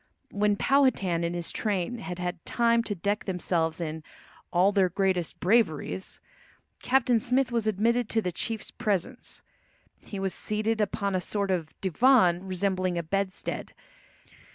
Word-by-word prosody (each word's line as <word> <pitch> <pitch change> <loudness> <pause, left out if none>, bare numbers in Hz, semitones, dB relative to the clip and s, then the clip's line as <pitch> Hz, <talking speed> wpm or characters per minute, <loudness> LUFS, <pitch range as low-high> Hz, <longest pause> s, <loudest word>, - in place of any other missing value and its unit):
When 205 0 +2
Powhatan 200 -10 +2
and 170 +1 -1
his 175 -1 -3
train 210 +3 -1
had 180 -5 -6
had 180 -1 -4
time 235 -1 +2
to 205 - -2
deck 200 +4 -1
themselves 170 -3 -1
in 160 -1 -4 0.5
all 185 +3 +4
"their 195 -3 +3
greatest 185 -2 0
braveries," 190 -3 +1 0.6
Captain 250 -2 +3
Smith 250 +3 +1
was 230 -2 0
admitted 225 +3 +1
to 225 - +1
the 180 - -1
chief's 225 +5 -4
presence. 215 +5 -2 0.6
He 200 - -7
was 195 -1 -1
seated 215 +1 -1
upon 200 -1 -1
a 185 - 0
sort 200 0 -1
of 165 -4 -3
divan 190 -3 +4
resembling 185 -1 0
a 170 - -1
bedstead. 195 +3 -3
195 Hz, 145 wpm, -27 LUFS, 180-225 Hz, 0.6 s, all